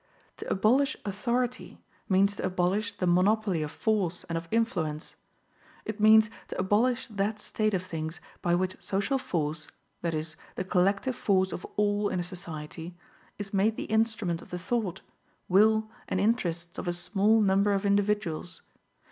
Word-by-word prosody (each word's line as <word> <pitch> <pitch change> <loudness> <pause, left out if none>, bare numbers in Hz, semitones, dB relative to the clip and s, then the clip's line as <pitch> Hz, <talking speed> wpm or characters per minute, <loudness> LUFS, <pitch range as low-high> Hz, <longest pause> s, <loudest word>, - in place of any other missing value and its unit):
To - - -6
abolish 260 +9 +3
authority, 240 +5 -2 0.3
means 200 +1 +3
to - - -6
abolish 190 +4 0
the 185 - -1
monopoly 185 0 +3
of 150 - -2
force 190 -1 0
and 165 - -5
of 165 0 -3
influence. 175 -10 -1 0.7
It 220 0 -5
means 215 0 +6 0.2
to - - -6
abolish 230 +7 +2
that 210 -2 -2
state 215 0 -1
of 180 - -1
things 160 -1 -5 0.2
by 175 0 +2
which 185 +1 -2
social 200 +8 0
force, 155 - -2 0.3
that 170 -2 -1
is, 155 +1 -4 0.2
the - - -2
collective 195 +7 +1
force 190 -3 +2
of - - -6
all 205 0 +2
in 185 - -1
a - - -1
society, 170 -1 -7 0.4
is 205 -1 -6
made 205 +3 +2
the - - -4
instrument 220 -6 +1
of - - -14
the 180 - -4
thought, 190 -1 -2 0.5
will 215 +3 +4 0.2
and 185 - -1
interests 175 -6 0
of - - -5
a 175 - +1
small 205 +5 +2
number 200 0 +3
of 200 0 0
individuals. 200 -4 0
195 Hz, 160 wpm, -28 LUFS, 175-215 Hz, 0.7 s, means